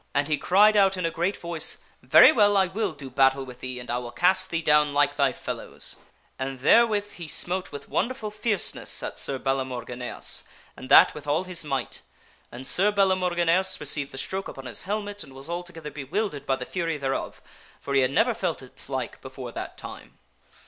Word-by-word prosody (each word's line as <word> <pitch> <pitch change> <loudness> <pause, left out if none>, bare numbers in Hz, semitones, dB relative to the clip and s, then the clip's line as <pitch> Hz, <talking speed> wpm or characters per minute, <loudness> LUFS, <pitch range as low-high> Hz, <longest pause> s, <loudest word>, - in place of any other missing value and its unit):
And 140 0 +2
he 155 - +1
cried 205 +8 +4
out 195 -2 +4
in 180 - -2
a 165 - 0
great 175 +5 -1
voice, 170 -2 +1
" - - -34
Very - - +8
well, 205 -7 +4
I 190 - +4
will 195 0 -2
do 140 -2 -10
battle 135 +1 +2
with 125 -1 -11
thee, 130 -1 -5
and 125 - -9
I 120 - 0
will 120 -1 -7
cast 185 +7 +3
thee 165 -1 -2
down 150 -2 +3
like 145 0 +3
thy 140 -2 +2
fellows! - - -5 0.2
" - - -38
And 130 -1 -4
therewith 210 - +4
he 170 -2 -9
smote 180 +4 -1
with 145 - -8
wonderful 235 -4 -2
fierceness 210 -1 -1
at - - -3
Sir 135 - -1
Balamorgineas, 125 -2 -3 0.3
and 130 - -11
that - - +8
with 150 -1 -10
all 155 +5 +1
his 180 -3 -2
might. 135 -4 -4 0.5
And 125 +2 -9
Sir 190 +10 +4
Balamorgineas 185 -2 +2
received 145 -1 -1
the 135 - -9
stroke 190 +7 -3
upon 135 - -9
his 125 - -2
helmet 205 -1 -3
and 135 - -14
was 135 +2 -10
altogether 170 -3 -6
bewildered 145 +1 -4
by 135 - +2
the 125 - -6
fury 165 -2 -2
thereof, 135 -2 -3 0.4
for 140 - -5
he 135 - +4
had 130 - +2
never 140 - +2
felt - - -3
its - - -9
like - - -4
before - - -8
that - - -7
time. - - -10
155 Hz, 205 wpm, -25 LUFS, 135-190 Hz, 0.5 s, Very